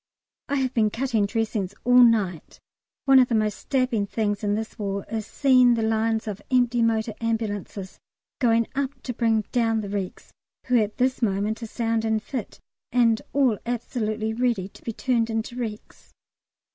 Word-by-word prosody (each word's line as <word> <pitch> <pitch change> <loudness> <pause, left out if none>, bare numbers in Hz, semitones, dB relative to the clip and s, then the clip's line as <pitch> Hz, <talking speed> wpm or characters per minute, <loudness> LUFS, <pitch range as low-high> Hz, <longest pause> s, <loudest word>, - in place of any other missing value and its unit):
I 285 - 0
have 260 -2 0
been 220 -2 +3
cutting 225 -3 0
dressings 210 -3 -2
all 250 +1 +6
night. 210 -9 +2 0.5
One 270 -1 +7
of 250 - +5
the 235 - 0
most 215 -1 0
stabbing 250 -6 0
things 205 -1 -1
in 205 0 +1
this 220 +1 -5
war 200 -1 -3
is 220 -1 -3
seeing 255 -3 +4
the 225 - -1
lines 220 0 0
of 205 -1 -5
empty 245 -2 +2
motor 225 -1 +1
ambulances 205 -4 -3 0.4
going 230 -3 +3
up 280 0 -3
to 245 - -4
bring 225 -2 +2
down 225 -3 +1
the 200 - -6
wrecks 195 -2 -5 0.3
who 250 -1 +3
at 210 -1 -1
this 255 +1 +1
moment 210 +1 0
are 230 - -5
sound 225 0 -1
and 220 -1 0
fit, 250 -5 -6 0.3
and 230 -2 +3
all 260 -7 +2
absolutely 220 -2 -2
ready 235 -5 0
to - - -17
be 230 - -4
turned 230 0 0
into 225 +2 -3
wrecks. 225 -4 -7
225 Hz, 170 wpm, -25 LUFS, 215-245 Hz, 0.5 s, One